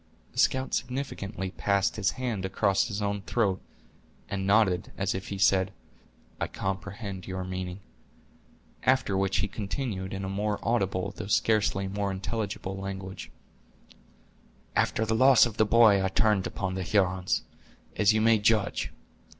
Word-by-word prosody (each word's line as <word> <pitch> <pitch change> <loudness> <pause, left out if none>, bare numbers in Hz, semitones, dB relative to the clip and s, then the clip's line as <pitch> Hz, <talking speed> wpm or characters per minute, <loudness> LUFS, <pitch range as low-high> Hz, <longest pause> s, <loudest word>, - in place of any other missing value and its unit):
The - - -4
scout 130 0 +2
significantly 105 -7 -3
passed 100 -1 +1
his 105 -3 0
hand 120 -7 -3
across 95 +1 +1
his 105 -2 -3
own 100 0 -1
throat, 100 -3 0 0.7
and 95 -1 -2
nodded, 100 -4 +3
as 100 +1 0
if 95 0 -5
he 100 - -4
said, 95 -1 +3 0.7
"I - - -1
comprehend 100 0 -5
your 95 -1 -4
meaning." 90 +1 -5 1.0
After 130 -6 +2
which 95 0 +1
he - - -1
continued, 100 -1 -4
in 95 0 -4
a - - -3
more 105 +2 -1
audible 100 -4 0
though - - -6
scarcely 105 -2 +2
more 100 +1 -2
intelligible 95 0 -3
language: 95 -1 -6 1.5
"After 110 - +1
the 110 - 0
loss 130 +2 +7
of 115 -2 -5
the 110 - +3
boy 110 -4 +6
I - - +2
turned 100 0 +2
upon 95 -3 -3
the 95 - -3
Hurons, 95 -1 +1 0.5
as 105 -1 +4
you 110 0 +2
may 115 0 +5
judge. 110 0 +1
100 Hz, 150 wpm, -28 LUFS, 95-110 Hz, 1.5 s, loss